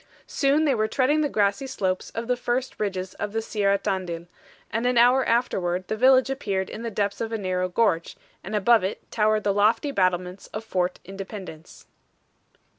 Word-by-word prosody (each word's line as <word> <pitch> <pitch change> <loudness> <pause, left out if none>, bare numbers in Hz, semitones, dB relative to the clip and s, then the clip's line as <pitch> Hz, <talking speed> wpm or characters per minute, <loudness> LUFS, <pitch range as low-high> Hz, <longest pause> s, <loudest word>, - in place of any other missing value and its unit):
Soon 285 +3 +2
they 285 - +3
were 215 -3 +1
treading 280 +6 +2
the 295 - +1
grassy 210 +4 +1
slopes 190 -8 -2
of 230 - -3
the 250 +1 +1
first 245 +1 -2
ridges 190 -3 -3
of 205 0 -3
the 225 - 0
Sierra 200 -3 +1
Tandil, 180 -4 -3 0.5
and 230 +3 0
an 250 -1 +1
hour 250 +3 +5
afterward 185 -7 0
the - - 0
village 260 +3 +5
appeared 200 -8 -2
in 220 - -7
the 230 - -3
depths 205 -1 -2
of 225 0 -3
a 225 - -1
narrow 185 -2 -1
gorge, 180 -4 0 0.3
and 210 +3 -4
above 220 +1 +4
it 190 - -5
towered 215 -1 +2
the 200 - +1
lofty 220 +7 +2
battlements 185 -3 -1
of 215 - -6
Fort 180 -4 -1
Independence. 190 -4 -9
210 Hz, 185 wpm, -25 LUFS, 190-240 Hz, 0.5 s, hour